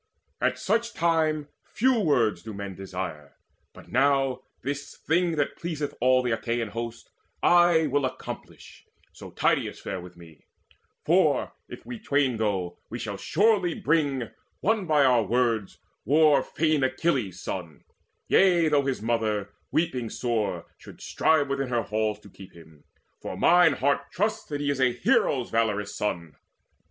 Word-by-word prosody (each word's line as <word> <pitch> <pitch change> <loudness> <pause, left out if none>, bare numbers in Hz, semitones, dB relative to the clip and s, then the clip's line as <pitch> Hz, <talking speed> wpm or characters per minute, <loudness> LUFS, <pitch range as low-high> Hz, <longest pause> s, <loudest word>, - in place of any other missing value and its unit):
At - - +1
such 230 +1 -1
time 160 -3 +1 0.2
Few 255 0 +1
words 120 - +2
do 110 +1 -8
men 100 -1 -6
desire. 90 -6 -7 0.4
But - - -15
now, 135 0 +2 0.2
this 140 +1 -5
thing 170 +1 +1
That 145 -2 -1
pleaseth 155 -4 -4
all 130 +1 +4
the 125 - -1
Achaean 115 0 -2
host, 115 +1 -7 0.3
will - - +4
I 175 -2 +5 0.2
Accomplish, - - -10 0.3
so - - -11
Tydeides - - 0
fare 95 -2 -5
with 90 0 -13
me; 80 -3 -16 0.6
For, - - +2 0.2
if - - -10
we 120 -1 -7
twain 140 -3 +1
go, 95 -5 -2
we - - -5
shall - - -5
surely 195 -2 +2
bring, 140 -6 0 0.3
Won 210 -2 +1
by 150 -3 +4
our 125 -2 +4
words, 115 -1 0 0.3
war 150 +4 +4
fain 155 -2 0
Achilles' 130 - 0
son, 85 -5 -6 0.4
Yea, 175 -4 +4
though 140 -2 +2
his 130 -5 -2
mother, 110 -3 -1 0.2
weeping 130 -8 -1
sore, 105 -9 -2
should - - -13
strive 155 -3 +1
Within 140 -1 -2
her 120 -2 0
halls 110 0 -1
to 100 - -15
keep 95 -1 -13
him; 80 -3 -17 0.4
for - - -6
mine 175 -3 +5
heart 140 +2 0
Trusts 210 +3 -1
that 145 -1 -4
he 145 0 0
is 135 -2 -2
a 125 -1 +3
hero's 125 +1 +1
valorous 105 -3 0
son." 85 -7 -3
130 Hz, 150 wpm, -26 LUFS, 105-155 Hz, 0.6 s, I